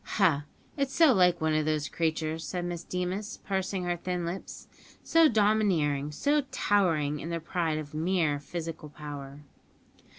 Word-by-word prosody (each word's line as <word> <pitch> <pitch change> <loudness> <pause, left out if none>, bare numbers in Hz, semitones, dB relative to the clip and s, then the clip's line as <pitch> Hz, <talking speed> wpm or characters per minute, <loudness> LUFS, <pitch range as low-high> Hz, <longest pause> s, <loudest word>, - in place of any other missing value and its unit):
"Ha! 160 -8 +3 0.3
it's 275 -1 -1
so 320 -5 +6
like 180 -4 +4
one 160 0 +2
of 155 0 +1
these 155 -1 0
creatures," 160 -1 -1
said 180 0 -3
Miss 175 -1 -4
Deemas, 185 +5 -3
pursing 190 -1 -1
her 175 0 0
thin 175 0 -3
lips; 175 +3 -6 0.4
"so 330 -1 +5
domineering, 195 - +2
so 290 - +2
towering, 165 - +1
in 160 - -6
their 170 0 -2
pride 165 -1 -1
of 150 -1 -6
mere 160 -2 +1
physical 165 0 -6
power." 145 -1 -8
170 Hz, 155 wpm, -29 LUFS, 155-190 Hz, 0.4 s, so